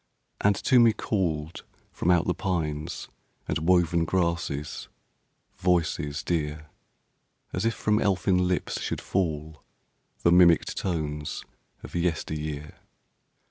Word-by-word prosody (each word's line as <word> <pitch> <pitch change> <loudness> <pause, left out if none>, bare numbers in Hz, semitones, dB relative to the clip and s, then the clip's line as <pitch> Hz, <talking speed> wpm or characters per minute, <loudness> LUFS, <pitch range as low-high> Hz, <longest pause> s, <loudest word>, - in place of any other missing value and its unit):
And 100 0 +4
to 125 +5 +4
me 115 -2 +6
called, 85 -7 -2 0.3
from 85 - -1
out 90 -1 +4
the 90 - +1
pines 80 -7 -3 0.4
And 75 - -1
woven 85 0 +3
grasses, 85 -4 -1 0.7
voices 85 -5 0
dear. 75 -2 -2 0.8
As 90 +4 -1
if 115 - +1
from 105 0 +1
elfin 90 -1 +2
lips 90 -1 -1
should - - -2
fall 80 -4 -2 0.6
The 85 - +5
mimicked 85 -2 +5
tones 75 -5 -3 0.4
of - - -10
yesteryear. 75 -3 -3
85 Hz, 110 wpm, -27 LUFS, 75-90 Hz, 0.8 s, me